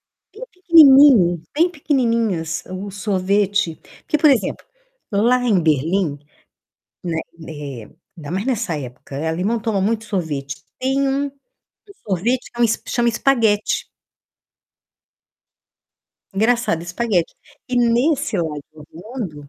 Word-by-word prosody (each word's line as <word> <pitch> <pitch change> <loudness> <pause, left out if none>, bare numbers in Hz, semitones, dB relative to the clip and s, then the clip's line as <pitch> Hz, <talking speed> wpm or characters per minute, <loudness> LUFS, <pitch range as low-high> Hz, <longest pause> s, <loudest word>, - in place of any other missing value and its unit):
bem 465 +4 -13
pequenininho 275 - +6
bem 335 +4 +3
pequenininhas 230 - -1
o 190 +2 -6
sorvete. 200 -2 0 0.3
Porque, 305 - 0
por 300 0 +5
exemplo, 250 -8 0 0.5
lá 235 +5 +2
em 210 -7 +2
Berlim, 155 0 0 0.8
né, 165 -3 -2 0.3
eh, 140 -7 -8 0.3
ainda 150 -4 -9
mais 190 +6 -3
nessa 225 - -1
época, 135 +3 -6
alemão 185 +8 -1
toma 215 -2 -1
muito 220 +3 -1
sorvete. 155 -9 -4 0.2
Tem 270 +2 0
um, 280 +1 -1
que 280 - -39 0.4
o - - -14 0.2
sorvete 235 +8 -1
que 240 - -8
é - - +5
um - - +5 0.2
chama 240 -1 +1
espaguete. 230 -4 +1 2.5
Engraçado, 220 -4 +1
espaguete. 180 0 -1 0.3
E 250 - -2
nesse 245 - +1
lado 155 -4 -3
do 155 -1 -14
mundo 175 - -8
205 Hz, 120 wpm, -20 LUFS, 165-250 Hz, 2.5 s, pequenininho